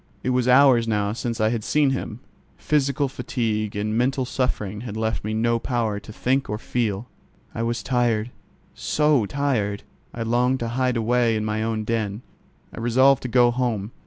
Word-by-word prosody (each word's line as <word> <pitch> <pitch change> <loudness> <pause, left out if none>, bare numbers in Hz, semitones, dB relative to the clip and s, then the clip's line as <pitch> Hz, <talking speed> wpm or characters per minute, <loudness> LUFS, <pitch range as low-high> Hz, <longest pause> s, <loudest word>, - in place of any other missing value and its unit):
It 130 - 0
was 125 -1 +1
hours 125 -2 +5
now 105 -2 0
since 120 0 -4
I 110 0 +3
had 115 -2 -2
seen 145 +2 +2
him. 125 -3 -4 0.4
Physical 140 -1 +1
fatigue 110 -5 -2
and 105 +1 -2
mental 130 +2 +1
suffering 105 -6 -2
had 110 -3 -6
left 110 0 -2
me 110 +1 -2
no 115 +1 +1
power 115 -4 -1
to 105 - -12
think 130 +4 0
or 105 - -2
feel. 110 -1 -2 0.5
I 115 - -4
was 115 -1 -2
tired, 120 -3 0 0.4
so 150 -8 +1
tired! 110 -7 -1 0.3
I 115 - -4
longed 125 +3 +1
to 115 - -2
hide 125 0 0
away 115 0 +2
in 110 0 -1
my 110 0 -1
own 110 -1 -1
den. 110 0 -2 0.5
I - - -8
resolved 130 +3 +4
to - - -4
go 120 0 +4
home. 120 -4 -2
115 Hz, 180 wpm, -23 LUFS, 110-125 Hz, 0.5 s, hours